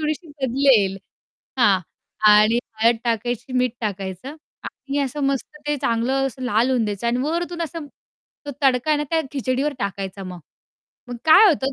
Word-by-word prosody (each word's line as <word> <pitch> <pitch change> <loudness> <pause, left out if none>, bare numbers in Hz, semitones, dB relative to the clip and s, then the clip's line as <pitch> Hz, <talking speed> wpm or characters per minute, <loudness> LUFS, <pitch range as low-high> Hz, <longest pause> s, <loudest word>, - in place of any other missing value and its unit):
थोडीशी 310 +3 -3 0.2
बदलेल. 245 -7 +3 0.6
हां 200 -5 +5 0.5
आणि 215 +2 +5 0.2
हळद 230 +1 +5
टाकायची, 240 +2 -2
मीठ 250 -1 +1
टाकायचं 200 - -5 0.3
आणि 275 +1 -5
असं 275 +2 -4
मस्त 275 +2 -3
ते 295 0 0
चांगलं 255 +4 +1
असं 260 0 -7
लाल 245 0 +1
होऊन 250 -3 +1
द्यायचं 205 +1 -3
आणि 235 +1 +1
वरून 340 +3 -2
असं 330 -1 -6 0.6
तो - - -3
तडका 265 +1 +2
आहे 305 - +4
ना 295 - -1
त्या 325 -1 +2
खिचडीवर 270 +1 -1
टाकायचा 195 -1 -4
मग. 180 -1 -8 0.7
मग 245 - -5
काय 320 +7 +8
होतं, 275 -5 0
255 Hz, 160 wpm, -22 LUFS, 220-285 Hz, 0.7 s, काय